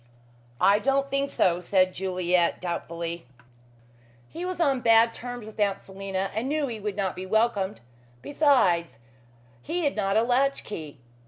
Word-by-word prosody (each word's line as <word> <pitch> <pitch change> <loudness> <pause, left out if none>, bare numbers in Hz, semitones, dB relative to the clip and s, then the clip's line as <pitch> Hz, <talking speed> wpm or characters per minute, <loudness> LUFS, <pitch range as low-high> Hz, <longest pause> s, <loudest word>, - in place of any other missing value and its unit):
"I 200 +1 +5
don't 275 +4 0
think 275 0 0
so," 175 -8 +2
said 185 +1 +2
Juliet 180 -2 0
doubtfully. 170 -3 -5 1.0
"He 345 +2 -6
was 365 0 -4
on 275 -6 +2
bad 230 0 +5
terms 245 -2 -7
with 220 0 -12
Aunt 200 -2 +1
Selina 195 0 -4
and 225 +5 -2
knew 300 0 0
he 235 -5 -5
would 205 -1 -4
not 195 -2 -2
be 185 +1 -6
welcomed. 215 -2 0 0.4
Besides, 195 - +2 0.6
he 345 - -3
had 285 - 0
not 200 -1 +1
a 225 - +4
latch 265 +3 +1
key. 155 -8 -8
210 Hz, 155 wpm, -26 LUFS, 185-260 Hz, 1.0 s, I